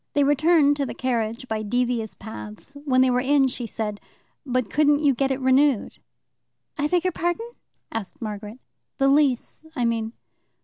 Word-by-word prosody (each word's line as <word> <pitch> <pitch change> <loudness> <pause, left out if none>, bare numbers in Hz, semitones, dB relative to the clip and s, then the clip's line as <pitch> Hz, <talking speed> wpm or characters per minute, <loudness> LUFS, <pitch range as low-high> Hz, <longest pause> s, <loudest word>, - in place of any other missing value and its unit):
They 290 - +3
returned 290 +1 +4
to 280 - 0
the - - -6
carriage 235 -1 -2
by 220 -2 -2
devious 240 0 -1
paths; 105 - -9
when 255 -2 +3
they 260 -1 +4
were 250 - +2
in, 270 +1 +3
she 245 -2 -5
said, 210 -1 -4 0.5
"But 255 -2 0
couldn't 295 0 +3
you 285 -2 +5
get 270 +2 0
it 265 0 -1
renewed?" 260 -2 +2 0.8
"I 295 -1 0
beg 355 +2 +1
your 365 - +2
pardon?" 345 +7 -2 0.4
asked 220 -4 -5
Margaret. 210 0 -6 0.4
"The 275 - +3
lease, 280 -1 +1
I 245 -4 0
mean." 225 -1 -1
255 Hz, 170 wpm, -24 LUFS, 225-290 Hz, 0.8 s, you